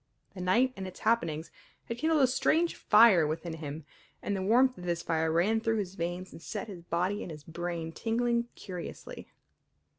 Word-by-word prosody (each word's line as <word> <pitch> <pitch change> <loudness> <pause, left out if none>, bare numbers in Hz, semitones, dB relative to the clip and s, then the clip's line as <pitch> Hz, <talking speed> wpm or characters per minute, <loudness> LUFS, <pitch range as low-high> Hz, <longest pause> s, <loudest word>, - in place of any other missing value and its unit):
The 185 - -7
night 235 +9 +3
and 190 -1 -5
its 185 - -11
happenings 165 -8 0 0.3
had 230 +1 -5
kindled 315 0 +3
a - - +8
strange 320 +6 +2
fire 210 -7 +6
within 160 +1 -4
him, 150 -1 -7 0.4
and 200 - -1
the 190 - -2
warmth 250 +6 +4
of - - -9
this 170 -1 -1
fire 160 -1 0
ran 190 +7 +2
through 225 0 +1
his 195 -3 -3
veins 175 +1 -4
and - - -11
set 205 +4 -5
his 190 -5 -8
body 180 +4 -1
and - - -6
his 150 -2 -9
brain 165 0 -4
tingling 235 +5 0
curiously. 180 -3 -8
185 Hz, 185 wpm, -30 LUFS, 170-230 Hz, 0.4 s, a